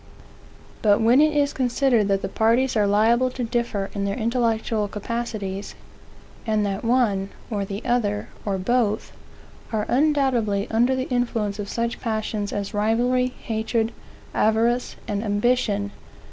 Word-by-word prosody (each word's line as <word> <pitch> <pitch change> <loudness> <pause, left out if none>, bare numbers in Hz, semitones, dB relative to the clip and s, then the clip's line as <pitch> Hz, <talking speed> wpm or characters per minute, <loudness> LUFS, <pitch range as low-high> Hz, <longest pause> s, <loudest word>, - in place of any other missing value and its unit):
But 205 -3 +4
when 235 +5 +5
it 305 0 +3
is 285 -1 +2
considered 245 -4 +2
that 195 -1 +1
the - - 0
parties 230 +6 +2
are 210 -2 +3
liable 230 +5 +3
to 250 0 -5
differ 230 -4 -2
in 200 - -2
their 200 0 -1
intellectual 225 -2 0
capacities, 210 -2 -4 0.7
and 215 -1 +2
that 195 0 -3
one, 225 -5 +2 0.2
or 200 -2 -1
the 200 +4 -6
other, 220 -4 0
or 200 -2 -1
both, 215 +2 0 0.6
are 215 -2 0
undoubtedly 255 -8 +2
under 240 +4 +3
the 260 0 -2
influence 230 -5 -1
of 200 -1 -4
such 235 0 -2
passions 215 -2 -2
as 200 -1 -3
rivalry, 240 +4 +2 0.2
hatred, 225 0 -1 0.4
avarice, 230 +3 +1
and 205 0 -2
ambition. 205 -1 +1
225 Hz, 140 wpm, -23 LUFS, 205-245 Hz, 0.7 s, when